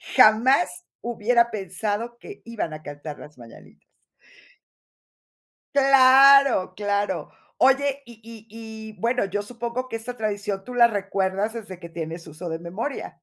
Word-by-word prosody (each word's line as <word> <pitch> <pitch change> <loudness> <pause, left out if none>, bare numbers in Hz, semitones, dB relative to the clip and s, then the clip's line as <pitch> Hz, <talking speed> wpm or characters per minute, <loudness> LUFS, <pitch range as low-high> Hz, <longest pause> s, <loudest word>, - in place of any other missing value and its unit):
Jamás 215 -7 +4 0.2
hubiera 235 +1 +1
pensado 210 +4 -4
que 410 - -12
iban 220 -9 -4
a 155 0 -9
cantar 145 +1 -8
las 150 -3 -13
mañanitas. 115 -1 -15 1.9
Claro, 275 -5 +6
claro. 205 0 -2 0.3
Oye, 275 +1 +2
y 235 - -13
y 225 -1 -13
y 220 -1 -10
bueno, 235 -1 0
yo 205 +2 -3
supongo 240 +3 -5
que 225 - -4
esta 245 +2 -7
tradición 205 -2 -3
tú 250 - -8
la 240 -1 +6
recuerdas 200 0 -2
desde 200 -6 -8
que 170 -1 -10
tienes 165 0 -6
uso 165 +3 -8
de 160 - -3
memoria. 190 - -6
220 Hz, 135 wpm, -24 LUFS, 185-240 Hz, 1.9 s, Claro